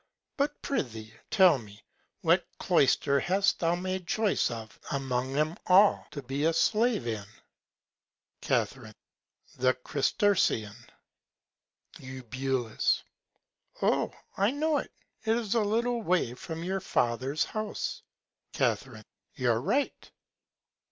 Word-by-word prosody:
But, 290 Hz, +1 st, -1 dB
prithee, 115 Hz, -, -3 dB, 0.2 s
tell 185 Hz, -8 st, +6 dB
me, 105 Hz, -2 st, -14 dB, 0.4 s
what -, -, +3 dB
Cloyster 140 Hz, 0 st, +3 dB
hast 190 Hz, +6 st, +2 dB
thou 170 Hz, 0 st, +2 dB
made 185 Hz, 0 st, -3 dB
Choice 215 Hz, +1 st, +1 dB
of 110 Hz, -2 st, -8 dB
among 130 Hz, -1 st, -2 dB
'em 155 Hz, +2 st, +1 dB
all, 195 Hz, +3 st, +5 dB
to 145 Hz, -, -7 dB
be 135 Hz, +3 st, -3 dB
a 165 Hz, -, +3 dB
Slave 220 Hz, -, +2 dB
in? 110 Hz, -3 st, -3 dB, 1.2 s
Ca. -, -, +2 dB, 0.9 s
The 130 Hz, 0 st, +3 dB
Chrysertian. 140 Hz, -, +1 dB, 1.2 s
Eu. 130 Hz, 0 st, -8 dB, 1.6 s
Oh! -, -, +2 dB, 0.3 s
I 200 Hz, +2 st, +3 dB
know 295 Hz, +2 st, +1 dB
it, -, -, -7 dB, 0.3 s
it 225 Hz, -1 st, +2 dB
is 230 Hz, -3 st, -1 dB
a 230 Hz, -, +3 dB
little 230 Hz, +3 st, 0 dB
Way 180 Hz, -, +1 dB
from 160 Hz, +5 st, -6 dB
your 190 Hz, +2 st, -1 dB
Father's 130 Hz, +4 st, 0 dB
House. 215 Hz, -1 st, -4 dB, 0.5 s
Ca. -, -, +2 dB, 0.6 s
You're 120 Hz, -2 st, +1 dB
right. 245 Hz, -, -1 dB
165 Hz, 110 wpm, -29 LUFS, 130-210 Hz, 1.6 s, tell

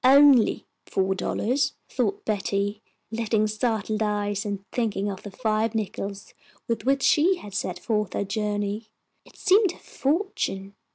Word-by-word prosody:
"Only 270 Hz, -3 st, +6 dB, 0.2 s
four 190 Hz, 0 st, +1 dB
dollars," 270 Hz, +8 st, 0 dB
thought 230 Hz, -6 st, -1 dB
Betty, 205 Hz, 0 st, -1 dB, 0.3 s
lifting 220 Hz, -1 st, +1 dB
startled 215 Hz, 0 st, -1 dB
eyes, 205 Hz, -1 st, 0 dB
and 200 Hz, -1 st, -4 dB
thinking 205 Hz, -4 st, -1 dB
of 190 Hz, -, -7 dB
the 205 Hz, -, -7 dB
five 220 Hz, 0 st, 0 dB
nickels 200 Hz, -2 st, -4 dB, 0.3 s
with 230 Hz, 0 st, -2 dB
which 275 Hz, +1 st, +2 dB
she 345 Hz, +6 st, +5 dB
had 205 Hz, -, -10 dB
set 180 Hz, -2 st, -2 dB
forth 210 Hz, +1 st, -1 dB
on -, -, 0 dB
her -, -, -1 dB
journey. 205 Hz, +1 st, -2 dB, 0.4 s
It -, -, -19 dB
seemed 390 Hz, -1 st, +4 dB
a -, -, -15 dB
fortune. 275 Hz, -, -2 dB
215 Hz, 150 wpm, -26 LUFS, 200-250 Hz, 0.4 s, Only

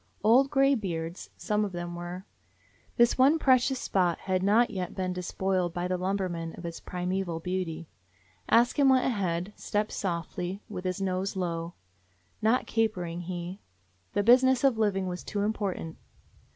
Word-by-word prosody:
Old 250 Hz, +6 st, +5 dB
gray 275 Hz, 0 st, +4 dB
beards, 170 Hz, -7 st, -4 dB
some 210 Hz, 0 st, 0 dB
of 200 Hz, -3 st, -3 dB
them 175 Hz, 0 st, -5 dB
were. 175 Hz, +2 st, -6 dB, 0.7 s
This 240 Hz, +2 st, +4 dB
one 280 Hz, +5 st, +6 dB
precious 260 Hz, -2 st, +3 dB
spot 180 Hz, -6 st, +1 dB
had 185 Hz, -1 st, 0 dB
not 215 Hz, +5 st, +3 dB
yet 185 Hz, -2 st, -4 dB
been 185 Hz, -1 st, -2 dB
despoiled 180 Hz, 0 st, -1 dB
by 175 Hz, 0 st, -1 dB
the 185 Hz, -, 0 dB
lum 185 Hz, +2 st, -1 dB
bermen 170 Hz, -4 st, -4 dB
of 175 Hz, -, -8 dB
its 170 Hz, -1 st, -5 dB
primeval 180 Hz, -1 st, -3 dB
beauty. 170 Hz, -2 st, -3 dB, 0.6 s
Ask 240 Hz, +5 st, +4 dB
Him 275 Hz, -1 st, +6 dB
went 260 Hz, -1 st, +4 dB
ahead, 190 Hz, -4 st, -1 dB
stepping 210 Hz, +1 st, -2 dB
softly, 180 Hz, +1 st, -3 dB
with 185 Hz, -3 st, -7 dB
his 185 Hz, +2 st, -2 dB
nose 190 Hz, +1 st, -1 dB
low. 170 Hz, -2 st, -3 dB, 0.7 s
Not 225 Hz, +4 st, +2 dB
capering, 180 Hz, -7 st, -1 dB
he. 175 Hz, +2 st, -5 dB, 0.5 s
The 205 Hz, -, +1 dB
business 255 Hz, +3 st, +5 dB
of 260 Hz, -5 st, +3 dB
living 195 Hz, -3 st, +1 dB
was 180 Hz, -1 st, -4 dB
too 205 Hz, -, -3 dB
important. 200 Hz, -6 st, -2 dB
190 Hz, 160 wpm, -28 LUFS, 175-220 Hz, 0.7 s, one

